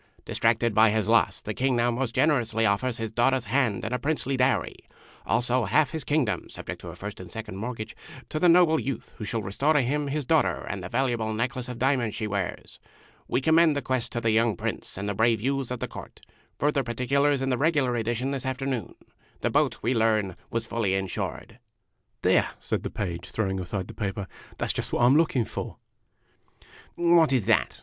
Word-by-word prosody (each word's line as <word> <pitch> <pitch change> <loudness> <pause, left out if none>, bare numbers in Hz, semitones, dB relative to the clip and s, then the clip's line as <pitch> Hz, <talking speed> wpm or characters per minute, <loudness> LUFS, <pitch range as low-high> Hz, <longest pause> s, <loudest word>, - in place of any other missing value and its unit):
Distracted 115 0 +1
by 110 +1 +6
his 105 -1 0
loss, 115 +1 +3
the 110 - -4
King 130 +3 +1
now 120 0 +2
most 120 -1 -2
generously 115 -7 +2
offers 110 +5 +1
his 115 -2 -4
daughter's 125 +2 +2
hand 125 -9 0
and 110 - -3
a 125 - 0
princely 140 -1 -1
dowry, 130 0 +1 0.5
also 125 0 +1
half 150 -4 +2
his 160 -3 -4
Kingdom 130 - 0
(subject - - -7
to - - -9
a 85 - -7
first 100 +3 -7
and 90 - -9
second 110 -4 -7
mortgage), 110 0 -5 0.3
to 155 - -3
the 175 - +5
noble 170 -2 +5
youth 135 - -5
who 105 - -4
shall 110 +1 -2
restore 135 +11 +1
to 150 - +4
him 145 +4 -1
his 145 0 -2
daughter 160 +2 +2
and 100 - -4
the 90 - -6
valuable 120 -4 0
necklace 125 +2 -2
of 125 - -5
diamonds 125 -4 +1
she 110 - -3
wears. 100 -3 -4 0.5
We 125 - 0
commend 160 +1 +4
the 140 - -1
quest 125 -3 -1
to 120 - -2
the 115 - +2
young 110 -2 +2
Prince - - -5
and 100 +1 -3
the 100 - -1
brave 115 +2 +2
youths 135 +2 -1
of 125 -1 -4
his - - -1
court. - - -10 0.4
Further 145 -1 +1
particulars 135 +4 +1
in 135 - 0
the 125 - +1
regular 145 -5 +2
edition 120 +3 -1
this 135 -2 -3
afternoon. 130 -4 -3 0.5
The - - 0
boat, - - +1
we 120 +4 +2
learn, 110 -5 +1
was 115 0 -2
fully 110 -4 0
insured. 95 +4 -4 0.6
"There!' - - +4
said - - -2
the - - -4
Page, 85 -4 -4
throwing 95 -3 -1
aside 95 +1 -4
the 115 - -9
paper. 100 -2 -3 0.3
"That - - -1
's - - -6
just - - -4
what - - +1
I - - +6
'm 130 +3 +6
looking 150 -7 +3
for! - - -6 0.5
" - - -40
" - - -23
What 170 -3 +4
is 125 -7 +2
that? - - +2
120 Hz, 210 wpm, -26 LUFS, 110-135 Hz, 0.6 s, by